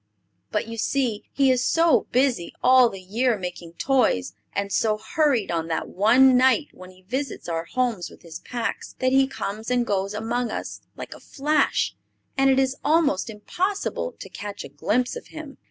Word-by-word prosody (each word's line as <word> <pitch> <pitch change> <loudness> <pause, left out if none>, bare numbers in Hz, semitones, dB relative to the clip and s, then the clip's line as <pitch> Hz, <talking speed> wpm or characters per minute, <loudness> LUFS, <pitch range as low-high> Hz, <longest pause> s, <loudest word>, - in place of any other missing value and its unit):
But, - - -2
you 230 0 -6
see, 245 -4 -1
he 270 -2 +3
is 255 -1 +1
so 330 +3 +3
busy 250 -9 +1
all 255 -1 +6
the 195 - -8
year 225 +6 0
making 180 -2 -7
toys, 170 - +1 0.2
and 200 0 -3
so 215 -1 +2
hurried 245 - +1
on 165 -1 -1
that 160 -1 -2
one 250 +7 +5
night 260 +4 +3
when 185 0 -12
he 185 0 -19
visits 260 +5 -4
our 165 -1 -2
homes 235 -5 -1
with - - -17
his 165 -1 -9
packs, 240 -2 -4
that 255 0 +1
he 270 0 +4
comes 220 -3 -5
and 245 -1 +1
goes 200 -1 -1
among 230 +2 -2
us - - -5 0.2
like - - -7
a - - -13
flash; 300 +2 0 0.4
and 270 0 +3
it 265 - +4
is 265 0 +1
almost 290 - +2
impossible 375 - -3
to - - -8
catch 205 -1 -7
a - - -9
glimpse 220 - -1
of - - -8
him. 310 -3 -10
240 Hz, 185 wpm, -24 LUFS, 200-270 Hz, 0.4 s, all